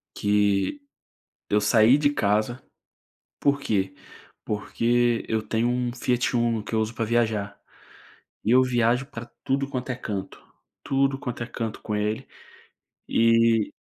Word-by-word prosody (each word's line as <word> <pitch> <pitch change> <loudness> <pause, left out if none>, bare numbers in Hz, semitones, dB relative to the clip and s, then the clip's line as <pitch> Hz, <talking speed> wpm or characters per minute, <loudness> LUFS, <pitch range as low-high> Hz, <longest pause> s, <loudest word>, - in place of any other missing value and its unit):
Que 105 - +1 0.7
eu 105 - +3
saí 110 +4 +5
de 145 -1 +3
casa, 110 +1 0 0.8
por 140 0 +2
quê? 95 -7 -1 0.5
Porque 120 +2 0
eu 110 0 0
tenho 110 +2 0
um 125 0 0
Fiat 125 0 0
Uno 115 -2 +1
que 105 - -8
eu 110 - +2
uso 110 +1 -1
para 115 -1 -2
viajar, 110 -3 0 0.8
e 110 - +1
eu 130 +1 +6
viajo 125 +1 +1
para 115 -3 -8 0.2
tudo 135 +1 0
quanto 130 -1 -4
é - - -3
canto, 100 -6 -6 0.4
tudo 135 0 +1
quanto 120 -1 -4
é - - -7
canto 115 -2 -5
com 105 - -3
ele, 105 +5 -2 0.8
e 115 -1 +3
115 Hz, 145 wpm, -25 LUFS, 110-125 Hz, 0.8 s, eu